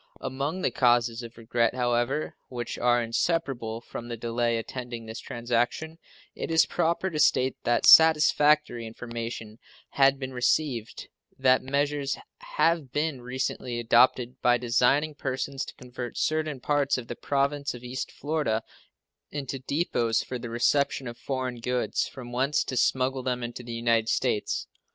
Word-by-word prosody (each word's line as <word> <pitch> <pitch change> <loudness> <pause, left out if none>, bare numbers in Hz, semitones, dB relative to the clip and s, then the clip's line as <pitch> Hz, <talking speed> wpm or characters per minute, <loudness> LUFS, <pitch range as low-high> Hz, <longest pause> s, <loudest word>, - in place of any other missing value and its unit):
Among 140 +8 -3
the - - +2
causes 120 -2 +2
of 115 -1 -10
regret, 115 +1 0
however, 120 +4 0
which 120 -2 -5
are 120 0 +3
inseparable 115 -3 -1
from 120 0 -8
the 120 -1 -5
delay 115 0 0
attending 120 0 -6
this 110 0 -7
transaction 120 +6 -2 0.3
it - - -5
is 160 0 +5
proper 170 +2 0
to 155 - -3
state 130 -3 +3
that 120 0 +2
satisfactory 150 -5 +6
information 115 -1 -6 0.3
has 135 0 +4
been 130 -1 -6
received 125 -2 -1 0.3
that 130 -1 +4
measures 140 +1 -1 0.2
have 170 - 0
been 150 -2 -1
recently 125 -1 -3
adopted 120 +1 +3
by 120 0 +4
designing 125 +6 +2
persons 135 -1 -3
to - - -10
convert 125 -1 -7
certain 155 -3 0
parts 145 +1 +1
of 120 -2 -6
the 120 - -5
Province 140 +1 -1
of 120 - -11
East 125 0 -5
Florida 145 -7 -1 0.7
into 135 -2 -5
depots 130 -5 0
for 125 - -5
the 120 0 -6
reception 135 +3 +1
of 120 - -6
foreign 130 0 -4
goods, 125 +1 -1
from 125 -3 -10
whence 135 +4 +1
to 130 - -5
smuggle 130 +1 +1
them 125 -1 -2
into 120 +1 -5
the 120 -1 -8
United 115 -1 +1
States. 120 -5 0
125 Hz, 150 wpm, -27 LUFS, 120-140 Hz, 0.7 s, satisfactory